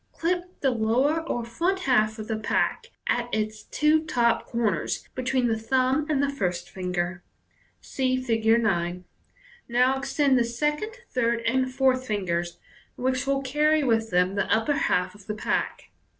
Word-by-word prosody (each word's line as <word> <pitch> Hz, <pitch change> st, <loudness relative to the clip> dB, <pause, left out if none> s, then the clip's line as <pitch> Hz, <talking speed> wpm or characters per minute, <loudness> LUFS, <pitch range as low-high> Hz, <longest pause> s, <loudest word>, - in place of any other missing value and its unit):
Clip 350 Hz, +1 st, -1 dB, 0.2 s
the 270 Hz, -, +3 dB
lower 250 Hz, +8 st, +1 dB
or 240 Hz, -1 st, -2 dB
front 345 Hz, +11 st, -1 dB
half 220 Hz, -7 st, +2 dB
of 215 Hz, -1 st, -7 dB
the 220 Hz, -, -1 dB
pack 220 Hz, -, 0 dB, 0.2 s
at 240 Hz, 0 st, -1 dB
its 215 Hz, 0 st, -2 dB
two 310 Hz, +1 st, +2 dB
top 240 Hz, -7 st, +1 dB
corners 225 Hz, -6 st, -1 dB
between 255 Hz, 0 st, 0 dB
the 225 Hz, -1 st, 0 dB
thumb 260 Hz, +5 st, +1 dB
and 285 Hz, -2 st, +2 dB
the -, -, +2 dB
first 180 Hz, -9 st, -3 dB
finger. 180 Hz, -1 st, -3 dB, 0.6 s
(See 255 Hz, -1 st, -1 dB
Fig. 230 Hz, -4 st, -1 dB, 0.2 s
9.) 175 Hz, -3 st, 0 dB, 0.7 s
Now 250 Hz, +3 st, +3 dB
extend 270 Hz, -1 st, +2 dB
the -, -, +3 dB
second, 295 Hz, -, -2 dB, 0.2 s
third, 235 Hz, -2 st, +1 dB
and 255 Hz, +2 st, 0 dB
fourth 255 Hz, -1 st, +1 dB
fingers, 175 Hz, -5 st, -2 dB, 0.4 s
which 260 Hz, +1 st, -1 dB
will 275 Hz, 0 st, +1 dB
carry 300 Hz, +3 st, +2 dB
with 225 Hz, -3 st, +1 dB
them 180 Hz, 0 st, +2 dB
the 200 Hz, -, -1 dB
upper 225 Hz, +6 st, +2 dB
half 185 Hz, -, 0 dB
of 205 Hz, -1 st, -17 dB
the 210 Hz, -, -3 dB
pack. 215 Hz, -, -2 dB
245 Hz, 160 wpm, -26 LUFS, 215-275 Hz, 0.7 s, the